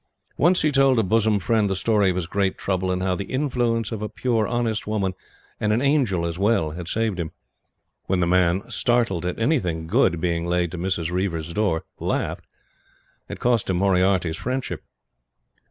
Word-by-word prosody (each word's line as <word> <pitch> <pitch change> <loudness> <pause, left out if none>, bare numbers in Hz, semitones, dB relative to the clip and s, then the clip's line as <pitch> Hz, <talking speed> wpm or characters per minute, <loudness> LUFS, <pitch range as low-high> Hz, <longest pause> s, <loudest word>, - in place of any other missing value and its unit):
Once 175 +3 +3
he 155 - +3
told 135 -2 +4
a 115 - +3
bosom 110 +2 +2
friend 105 +1 +1
the 95 - 0
story 105 0 +2
of 90 - -1
his 90 -2 -2
great 95 +2 -1
trouble, 95 -1 -1
and 90 0 -1
how 95 -1 +1
the 100 +2 -3
"influence 120 -5 -1
of 110 -2 -4
a 105 - -3
pure 115 -4 0
honest 115 -3 -1
woman, 100 -3 -1 0.5
and 105 - +1
an 110 - +2
angel 130 - +1
as 85 +1 -4
well" 100 -7 +2
had 85 +1 -7
saved 110 -1 -1
him. 80 -2 -2 0.8
When 95 -1 +1
the 85 - +2
man 90 +1 +2
startled 110 -6 +1
at 90 - -3
anything 95 - 0
good 85 +1 +2
being 85 0 -1
laid 85 -1 0
to 90 - -6
Mrs. 85 -2 -1
Reiver's 85 -3 -2
door 95 -5 0 0.2
laughed, - - -2 0.8
it - - -6
cost 120 -4 +1
him 95 - +1
Moriarty's 90 -3 +2
friendship. 130 +1 -3
95 Hz, 185 wpm, -23 LUFS, 90-115 Hz, 0.8 s, told